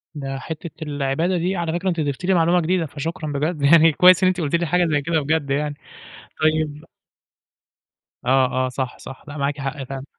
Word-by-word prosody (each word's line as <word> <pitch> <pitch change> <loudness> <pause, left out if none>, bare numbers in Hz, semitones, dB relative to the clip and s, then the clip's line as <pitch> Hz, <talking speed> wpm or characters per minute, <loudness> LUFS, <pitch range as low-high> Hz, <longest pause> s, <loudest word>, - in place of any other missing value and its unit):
ده 135 -2 -5
حتّة 160 +4 -7
العبادة 150 +4 -1
دي 180 +3 -1
على 170 -2 -2
فكرة 180 +2 -1
أنتِ 170 -2 -2
ضفتِ 145 +2 -2
لي 190 - +3
معلومة 175 0 +3
جديدة، 175 +1 0
فشكرًا 155 +1 -5
بجد 150 +2 -2
يعني 160 +3 +6
كويّس 180 +4 +6
إن - - +5
أنتِ 185 -1 0
قلتِ 150 +1 0
لي 170 0 0
حاجة 180 +2 +2
زي 150 -3 +1
كده 160 +2 0
بجد 145 0 -1
يعني، 145 +1 -1 0.7
طيّب 155 -1 0 1.4
آه، 130 0 +2
آه - - -2
صح، 130 0 -4
صح 135 - -11
لأ 150 +1 -8
معاكِ 140 +1 -2
حق 135 +1 -4
فعلًا. 135 0 -7
155 Hz, 195 wpm, -21 LUFS, 140-170 Hz, 1.4 s, يعني